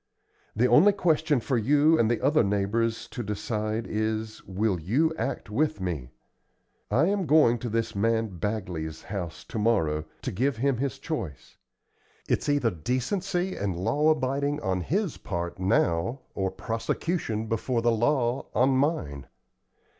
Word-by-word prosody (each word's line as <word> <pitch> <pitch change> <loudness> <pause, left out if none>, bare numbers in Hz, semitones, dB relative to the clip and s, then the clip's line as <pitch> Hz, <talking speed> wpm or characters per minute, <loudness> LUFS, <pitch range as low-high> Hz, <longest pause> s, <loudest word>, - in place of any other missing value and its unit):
The 115 +4 +3
only 180 +10 +6
question 160 -6 +2
for 125 +1 0
you 150 +7 +4
and 110 - +3
the 120 - 0
other 145 0 +4
neighbors 105 +3 0
to 125 - -5
decide 110 +1 -2
is, 110 0 -2
Will 95 0 0
you 135 - +1
act 135 -7 -4
with 155 +7 0
me? 80 -9 -3 0.8
I 145 +6 +3
am 195 -2 0
going 140 -6 +5
to 120 - -4
this 115 0 -1
man 110 -3 0
Bagley's 90 -6 -3
house 90 -5 -5
to 110 - -5
morrow, 80 -9 +1 0.2
to - - -2
give 130 +5 0
him 135 +1 +1
his 135 +2 -2
choice. 135 - -5 0.7
It's - - 0
either 145 -6 +2
decency 175 - -1
and 95 -4 -2
law 145 - +2
abiding 145 0 0
on 95 -5 -1
his 180 - -1
part, 85 +2 -4
now, 95 +4 +1
or 95 -1 -1
prosecution 115 - -2
before 115 +2 -1
the 120 - +4
law 120 +2 +1
on 130 +2 +4
mine. 130 - 0
115 Hz, 145 wpm, -27 LUFS, 100-145 Hz, 0.8 s, only